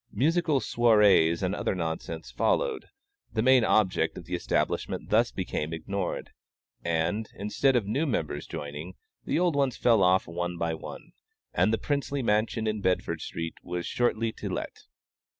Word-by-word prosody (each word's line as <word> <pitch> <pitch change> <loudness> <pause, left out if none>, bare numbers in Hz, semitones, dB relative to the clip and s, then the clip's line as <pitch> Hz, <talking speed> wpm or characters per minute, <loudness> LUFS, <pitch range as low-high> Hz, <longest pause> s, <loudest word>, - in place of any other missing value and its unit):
Musical 160 0 +2
soirées 105 -8 +4
and 90 +1 0
other 100 - -1
nonsense 80 -1 -4
followed; 485 -3 0 0.5
the 110 - +1
main 130 -1 +6
object 95 -7 +2
of 85 - -8
the 90 - -7
establishment 90 - -1
thus - - +4
became 75 +2 -3
ignored, 95 +3 -4 0.5
and, 85 +6 0
instead 105 +7 +1
of 120 -5 +2
new 140 +10 0
members 75 - -2
joining, 75 +5 -6 0.3
the - - 0
old 175 -2 +2
ones 135 -3 +1
fell 115 -4 +4
off 90 0 +4
one 85 +1 -3
by 85 -1 -1
one, 80 - -9 0.4
and 90 +5 +3
the 110 - +2
princely 140 +2 -2
mansion 110 +1 +1
in 110 -1 -1
Bedford 95 -1 0
street 80 -1 -4
was 90 -1 -4
shortly 115 -2 0
to - - -6
let. - - -4
100 Hz, 155 wpm, -28 LUFS, 85-120 Hz, 0.5 s, main